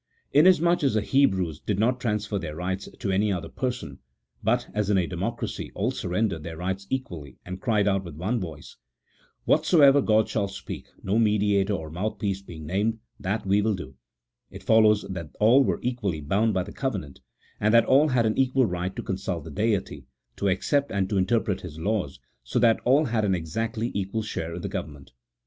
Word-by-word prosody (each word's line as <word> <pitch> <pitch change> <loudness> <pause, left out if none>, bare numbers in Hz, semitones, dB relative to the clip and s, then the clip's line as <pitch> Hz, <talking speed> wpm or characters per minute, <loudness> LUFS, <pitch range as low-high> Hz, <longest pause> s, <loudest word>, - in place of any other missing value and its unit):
Inasmuch 175 +2 +5
as 135 -6 +2
the 110 - +1
Hebrews 95 - +2
did 105 - -2
not 125 +4 +1
transfer 105 -4 -1
their 75 -4 -6
rights 95 +3 -3
to 100 - -2
any 100 +2 +2
other 90 -3 -3
person 125 -1 -4 0.4
but, - - +1
as 105 -1 -1
in 100 - +3
a 90 - +2
democracy, 75 - -4
all - - 0
surrendered 90 -1 -1
their 80 +1 -7
rights 95 +3 -3
equally, 85 - -5
and 90 +1 -7
cried 105 -4 +2
out 95 -1 +1
with 85 -4 -9
one 100 +10 -1
voice, 80 -6 -8 0.3
" - - -36
What - - +3
soever 145 -4 +6
God 110 -3 +3
shall 100 -3 -1
speak 95 0 -8 0.2
(no 100 +4 +1
mediator 105 -2 +2
or 80 -5 -4
mouthpiece 100 +2 -2
being 80 -5 -10
named) 105 +7 0 0.2
that 100 +2 -2
will 100 +2 +3
we 110 -1 +1
do," 65 -7 -9 0.5
it - - -11
follows 110 -2 +5
that 85 -5 -7
all 120 +6 +6
were - - 0
equally 115 -10 -1
bound 100 +8 +1
by 95 - +1
the 100 - -10
covenant, 100 - -4 0.4
and 105 +1 +2
that 115 0 +6
all 140 +4 +5
had 125 -5 +2
an 110 - +1
equal 130 0 +3
right 90 -1 -3
to - - -5
consult 95 -4 -3
the 80 - -9
Deity, 105 +2 -1 0.3
to 100 - 0
accept 140 +10 +1
and 95 -1 0
to 100 - +1
interpret 100 -1 +1
His 80 -4 -9
laws, 95 -5 -2 0.2
so - - -3
that 115 -2 +4
all 140 +5 +4
had 115 -4 0
an 95 -2 +2
exactly 110 +8 -3
equal 100 +3 -2
share 85 -6 -4
in 85 - -7
the - - -2
government. 70 -2 -6
100 Hz, 200 wpm, -26 LUFS, 90-115 Hz, 0.5 s, soever